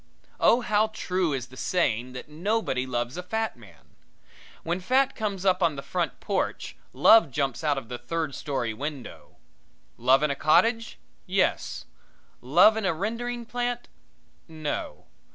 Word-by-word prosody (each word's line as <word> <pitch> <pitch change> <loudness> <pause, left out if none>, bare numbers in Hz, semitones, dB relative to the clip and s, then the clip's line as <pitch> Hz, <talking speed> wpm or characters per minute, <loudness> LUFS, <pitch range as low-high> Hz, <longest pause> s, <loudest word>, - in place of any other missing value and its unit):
Oh 240 - +5
how 215 -1 +2
true 185 -5 -1
is 130 -3 -3
the 130 - -14
saying 125 -6 0
that 125 - -8
nobody 160 - -1
loves 120 +2 -3
a - - -3
fat 220 +4 -2
man! 115 -4 -18 0.7
When 170 +2 -1
fat 260 +7 +2
comes 200 -4 -3
up 185 -1 +3
on 165 -4 +2
the 140 - -7
front - - -2
porch - - -2 0.2
love 225 -8 +6
jumps 135 +1 -2
out 145 -2 +1
of 135 - -5
the 125 0 -6
third 155 +3 -3
story 130 -7 -3
window. 140 +1 -7 0.6
Love 130 +4 +4
in 150 - +2
a - - -1
cottage? 225 - +2 0.3
Yes. 190 +1 0 0.6
Love 175 - +5
in 220 - -2
a 170 - +1
rendering 235 +6 -3
plant? 245 0 -3 0.6
No. 155 -3 -5
165 Hz, 150 wpm, -26 LUFS, 135-220 Hz, 0.7 s, love